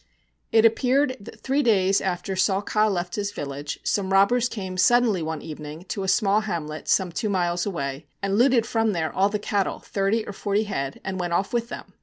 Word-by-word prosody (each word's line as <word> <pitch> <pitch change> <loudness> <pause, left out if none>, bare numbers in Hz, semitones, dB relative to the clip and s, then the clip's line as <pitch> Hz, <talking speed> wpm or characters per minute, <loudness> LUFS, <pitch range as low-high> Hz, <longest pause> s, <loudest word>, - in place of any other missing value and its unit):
It 225 0 +5
appeared 255 +4 +3
that 200 - -12
three 275 +2 +1
days 195 -6 +3
after 190 +1 -2
Saw 190 +1 +2
Ka 215 +1 +1
left 180 -3 -2
his 205 0 -2
village, 145 -3 -5
some 195 -2 -1
robbers 225 +6 +4
came 190 -4 -5
suddenly 225 0 +3
one 160 -1 -4
evening 155 +1 -8
to 200 - -3
a 190 - -3
small 200 +2 +3
hamlet 160 -7 -5
some 185 -2 +2
two 210 +5 -2
miles 175 -1 0
away 140 -6 -4
and 195 0 -1
looted 240 0 +4
from 225 -2 +1
there 160 -3 -2
all 195 +1 +3
the 210 - -1
cattle, 205 -1 -1
thirty 200 +3 -1
or 205 - -6
forty 205 +2 0
head, 140 -10 -4
and 190 -1 -4
went 175 -1 -2
off 195 +5 0
with 235 0 -1
them. - - -9
195 Hz, 205 wpm, -24 LUFS, 175-220 Hz, -, It